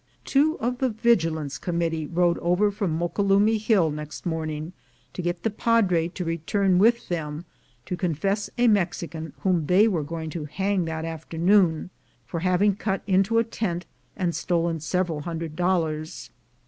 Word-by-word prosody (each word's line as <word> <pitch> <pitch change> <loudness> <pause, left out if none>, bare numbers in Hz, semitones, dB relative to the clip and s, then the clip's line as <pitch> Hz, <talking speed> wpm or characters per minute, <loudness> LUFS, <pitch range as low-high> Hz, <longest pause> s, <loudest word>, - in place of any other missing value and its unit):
Two 300 +3 +2
of 245 +2 -2
the 260 - +2
Vigilance 165 - +1
Committee 165 -2 -1
rode 175 +1 +1
over 180 +4 +2
from 195 -6 -2
Moquelumne 200 +5 +2
Hill 205 -7 +3
next 150 +3 -7
morning, 160 -1 -3 0.4
to - - -4
get 175 0 -3
the 225 - +1
Padre 200 -7 +2
to 180 +1 -6
return 180 +3 +1
with 235 +4 +3
them 160 -1 -4 0.4
to 180 - -3
confess 195 +4 -1
a 245 0 +4
Mexican 170 -6 0
whom 175 -6 +1
they 195 +6 +5
were 180 -8 0
going 160 +1 -5
to 155 -2 -5
hang 190 +4 -1
that 160 0 -4
afternoon, 165 +2 +1 0.3
for 170 - -4
having 185 +3 +2
cut 195 -1 -2
into 195 +3 +2
a 230 - +5
tent 190 -6 -3 0.3
and 180 -3 0
stolen 170 -2 0
several 170 0 -1
hundred 165 -1 -5
dollars. 165 -3 -1
175 Hz, 155 wpm, -25 LUFS, 160-200 Hz, 0.4 s, they